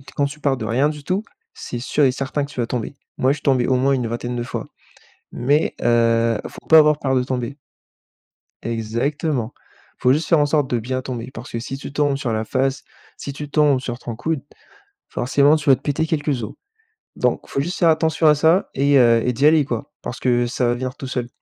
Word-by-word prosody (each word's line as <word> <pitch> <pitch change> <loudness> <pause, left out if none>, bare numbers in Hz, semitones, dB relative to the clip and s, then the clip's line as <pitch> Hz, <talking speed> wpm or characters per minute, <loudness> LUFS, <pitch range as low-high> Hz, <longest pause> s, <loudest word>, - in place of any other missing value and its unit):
quand 145 - +2
tu 145 +2 -6
pars 135 -3 +1
de 110 - -5
rien 130 +7 +2
du 150 -2 -7
tout, 190 +6 -1 0.3
c'est 125 - -6
sûr 145 +3 +1
et 130 - +4
certain 135 +2 -2
que - - -14
tu 130 - -8
vas 120 - +1
tomber. 125 +3 -4 0.2
Moi 130 +1 +3
je - - 0
suis 145 - -13
tombé 130 -3 +2
au 130 - +2
moins 135 +2 +2
une 125 -3 -1
vingtaine 120 +1 -4
de 120 - -2
fois, 125 - -5 0.7
mais 145 +6 +1
heu, 115 -1 +3
il - - -7
faut - - -13
pas 160 -1 +8
avoir 150 -1 +4
peur 135 -1 0
de 125 - +3
tomber. 130 +1 -3 1.1
Exactement, 115 +3 -2 0.4
il - - -32
faut 125 +1 +5
juste 155 +3 -1
faire 165 - +5
en 145 - +4
sorte 145 -2 +1
de 120 - 0
bien 130 +3 -3
tomber, 125 -1 -6
parce 115 0 -9
que 115 - -3
si 135 +3 -5
tu 140 - -8
tombes 145 -2 +1
sur 125 -5 -3
la 110 0 -1
face, 135 +3 -1 0.3
si 140 - -6
tu 145 +1 -7
tombes 145 -3 +3
sur 125 -1 -5
ton 115 - -6
coude, 160 +3 -2 0.7
forcément 140 +4 +3
tu 145 -2 -4
vas 130 - +7
te - - -19
péter 155 +2 -1
quelques 145 -5 -1
os, 105 - -8 0.6
donc - - 0
il - - -19
faut 135 - -1
juste 175 +6 -4
faire 170 - +5
attention 160 0 +2
à 150 - +6
ça 160 +5 +3
et 140 +1 +3
heu, 115 -2 +5
et 125 - +1
d'y 135 +5 +1
aller 155 -2 +5
quoi, 120 -5 -4
parce 120 - -6
que 120 -1 +2
ça 125 +1 0
va 120 - +2
venir 130 +2 -4
tout 140 -4 -7
seul 125 -2 -3
135 Hz, 240 wpm, -21 LUFS, 120-145 Hz, 1.1 s, pas